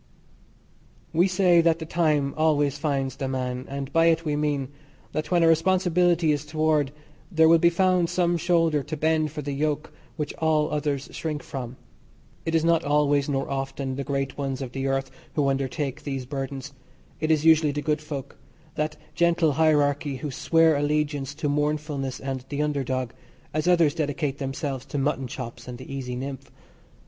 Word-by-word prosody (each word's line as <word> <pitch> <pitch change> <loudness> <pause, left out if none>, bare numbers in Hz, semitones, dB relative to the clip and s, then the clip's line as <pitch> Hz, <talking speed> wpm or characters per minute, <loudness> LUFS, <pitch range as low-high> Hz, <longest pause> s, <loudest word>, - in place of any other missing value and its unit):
We 175 +4 +4
say 180 -2 +4
that 165 -1 +3
the 160 - -6
time 155 -4 +1
always 145 -3 +2
finds 135 -4 -1
the 135 - -2
man, 130 -1 -3
and 140 0 -5
by 165 0 +4
it 165 0 +2
we 150 -1 0
mean: 145 -3 -1 0.4
that 155 - -3
when 175 -2 +3
a - - +5
responsibility 175 -1 +3
is 145 -1 0
toward 155 -2 +1 0.4
there 160 -2 +5
will 165 0 +6
be 170 - +5
found 180 -1 +2
some 175 -1 +1
shoulder 165 -3 +2
to 155 +3 -5
bend 155 0 +2
for 150 0 -5
the 145 - -3
yoke 150 +1 -2 0.2
which 150 -3 -3
all 155 -1 +2
others 145 -2 -1
shrink 155 -2 -4
from. 125 -2 -6 0.7
It 165 - +1
is 165 0 +2
not 170 -1 +3
always 145 -1 +2
nor 135 -1 -1
often 135 -1 -3
the 140 - -3
great 135 0 -3
ones 135 -2 -2
of 130 -3 -5
the 135 +1 -2
earth 135 0 -1 0.2
who 145 -2 +2
undertake 135 +1 -2
these 135 -3 -4
burdens 135 0 -5 0.5
it 155 - -1
is 155 -1 +2
usually 160 -2 +5
the 145 +1 -3
good 150 +1 0
folk, 145 -3 -7 0.3
that 150 +1 -2 0.2
gentle 170 -2 +3
hierarchy 145 -2 +2
who 140 +3 -5
swear 165 +4 +3
allegiance 145 -1 -1
to 155 0 -2
mournfulness 145 -2 -1
and 135 -1 -4
the 145 0 -1
under 145 -2 -1
dog, 130 -1 -2 0.4
as 155 +2 -1
others 170 -5 +4
dedicate 145 -3 -2
themselves 135 -1 -3
to 140 - -4
mutton 135 -1 0
chops 120 -1 -7
and 125 -1 -6
the 130 +2 -9
easy 125 -2 -4
nymph. 135 +1 -6
145 Hz, 180 wpm, -25 LUFS, 135-160 Hz, 0.7 s, will